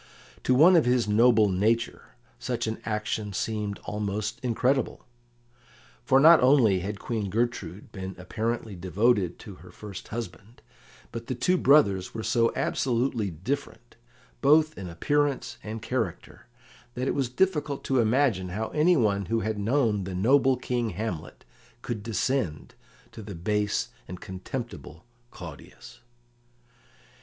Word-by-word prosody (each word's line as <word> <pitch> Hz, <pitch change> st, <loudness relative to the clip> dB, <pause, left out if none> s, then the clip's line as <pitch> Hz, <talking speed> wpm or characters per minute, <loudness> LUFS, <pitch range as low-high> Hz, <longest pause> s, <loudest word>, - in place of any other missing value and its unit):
To 125 Hz, -, +3 dB
one 170 Hz, +7 st, +7 dB
of 165 Hz, -, +5 dB
his 125 Hz, -2 st, +2 dB
noble 110 Hz, 0 st, +5 dB
nature 110 Hz, +5 st, -1 dB, 0.2 s
such 120 Hz, -2 st, -2 dB
an 110 Hz, 0 st, -4 dB
action 105 Hz, -1 st, -2 dB
seemed 105 Hz, 0 st, -2 dB
almost 105 Hz, +1 st, -3 dB
incredible. 130 Hz, +3 st, 0 dB, 1.0 s
For 135 Hz, -, +4 dB
not 160 Hz, +3 st, +8 dB
only 125 Hz, -7 st, +5 dB
had 100 Hz, +3 st, -4 dB
Queen 105 Hz, -2 st, -3 dB
Gertrude 105 Hz, -3 st, -3 dB
been 95 Hz, -1 st, -6 dB
apparently 110 Hz, +3 st, -3 dB
devoted 95 Hz, +1 st, +1 dB
to 100 Hz, -3 st, -11 dB
her 90 Hz, -, -13 dB
first 100 Hz, +1 st, -9 dB
husband, 115 Hz, 0 st, -8 dB, 0.5 s
but 115 Hz, 0 st, -7 dB
the 130 Hz, -, -2 dB
two 180 Hz, +10 st, +2 dB
brothers 105 Hz, -, +3 dB
were 110 Hz, -, -4 dB
so 115 Hz, +1 st, +2 dB
absolutely 120 Hz, -4 st, 0 dB
different, 120 Hz, -, -5 dB, 0.5 s
both 155 Hz, +2 st, +4 dB
in 95 Hz, -3 st, -7 dB
appearance 130 Hz, -, -1 dB
and 110 Hz, +1 st, -6 dB
character, 115 Hz, -7 st, -4 dB, 0.5 s
that 125 Hz, +2 st, -2 dB
it -, -, +1 dB
was 135 Hz, -4 st, -1 dB
difficult 150 Hz, -1 st, 0 dB
to 135 Hz, -1 st, +1 dB
imagine 115 Hz, -5 st, +2 dB
how 110 Hz, +5 st, -3 dB
anyone 120 Hz, -, +2 dB
who 115 Hz, +3 st, 0 dB
had 110 Hz, 0 st, -2 dB
known 110 Hz, -3 st, +1 dB
the 95 Hz, -1 st, -5 dB
noble 130 Hz, +6 st, +3 dB
King 120 Hz, -2 st, -2 dB
Hamlet 100 Hz, -4 st, -5 dB, 0.4 s
could 115 Hz, -3 st, -4 dB
descend 110 Hz, -, -2 dB, 0.4 s
to -, -, -10 dB
the 100 Hz, -2 st, -8 dB
base 105 Hz, +4 st, -1 dB, 0.2 s
and 90 Hz, +1 st, -8 dB
contemptible 95 Hz, -, -7 dB, 0.2 s
Claudius. 90 Hz, +8 st, -11 dB
110 Hz, 135 wpm, -27 LUFS, 100-125 Hz, 1.0 s, not